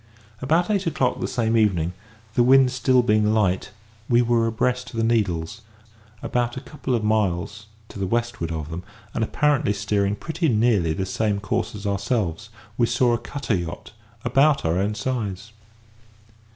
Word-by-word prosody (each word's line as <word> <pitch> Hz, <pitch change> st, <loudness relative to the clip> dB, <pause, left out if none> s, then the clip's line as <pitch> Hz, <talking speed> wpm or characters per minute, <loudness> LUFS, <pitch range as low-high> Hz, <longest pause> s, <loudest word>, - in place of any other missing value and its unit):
About 165 Hz, +9 st, +2 dB
eight 195 Hz, -3 st, 0 dB
o'clock 130 Hz, -6 st, 0 dB
the -, -, -2 dB
same 115 Hz, -1 st, 0 dB
evening, 90 Hz, -6 st, +2 dB, 0.4 s
the 120 Hz, -, +3 dB
wind 130 Hz, +1 st, +5 dB
still 125 Hz, 0 st, +3 dB
being 105 Hz, -1 st, +2 dB
light, 95 Hz, -4 st, +1 dB, 0.4 s
we 120 Hz, 0 st, +4 dB
were 115 Hz, -1 st, +2 dB
abreast 125 Hz, +2 st, -1 dB
of -, -, -11 dB
the 115 Hz, -, 0 dB
Needles; 105 Hz, -4 st, 0 dB, 0.6 s
about 120 Hz, 0 st, -1 dB
a -, -, -4 dB
couple 135 Hz, -2 st, -3 dB
of 115 Hz, -, -1 dB
miles 105 Hz, -1 st, -1 dB, 0.2 s
to -, -, -9 dB
the 95 Hz, -, -1 dB
westward 115 Hz, -6 st, -2 dB
of 80 Hz, -1 st, -5 dB
them, 85 Hz, +2 st, -4 dB, 0.3 s
and 115 Hz, -, 0 dB
apparently 145 Hz, -2 st, +1 dB
steering 100 Hz, -1 st, 0 dB
pretty 160 Hz, -, -2 dB
nearly 105 Hz, -8 st, +2 dB
the 95 Hz, +4 st, -2 dB
same 105 Hz, +1 st, -1 dB
course 115 Hz, +1 st, -2 dB
as 105 Hz, 0 st, -8 dB
ourselves, 100 Hz, -3 st, -1 dB, 0.3 s
we 120 Hz, -, +4 dB
saw 120 Hz, 0 st, +2 dB
a 120 Hz, -, 0 dB
cutter 140 Hz, -4 st, -3 dB
yacht 85 Hz, -3 st, -4 dB, 0.3 s
about 135 Hz, -, +3 dB
our 80 Hz, +3 st, +1 dB
own 105 Hz, +2 st, 0 dB
size. 115 Hz, -4 st, -3 dB
115 Hz, 165 wpm, -23 LUFS, 100-125 Hz, 0.6 s, wind